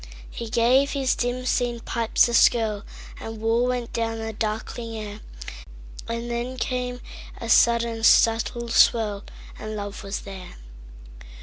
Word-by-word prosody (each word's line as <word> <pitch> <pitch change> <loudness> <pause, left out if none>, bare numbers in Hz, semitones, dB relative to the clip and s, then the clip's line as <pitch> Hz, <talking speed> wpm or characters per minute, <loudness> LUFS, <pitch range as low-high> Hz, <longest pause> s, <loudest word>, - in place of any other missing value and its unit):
He 230 - -6
gave 255 +5 +3
his 270 -2 +1
dim 245 +1 -2
seen 245 -1 0
pipes 230 0 +2
a - - -3
skirlAnd 225 -1 0
war 225 +3 +1
went 245 -2 -3
down 225 -1 -1
the 220 0 -5
darkling 225 +1 -4
air; 210 -1 -7 0.9
Then 235 +2 -3
came 250 -1 -3 0.4
a 230 - -6
sudden 235 0 +3
subtle 230 +1 +3
swirl, 210 -3 +3 0.4
And 215 0 -6
love 205 -1 -6
was 200 0 -4
there. 190 -2 -10
230 Hz, 125 wpm, -24 LUFS, 220-240 Hz, 0.9 s, gave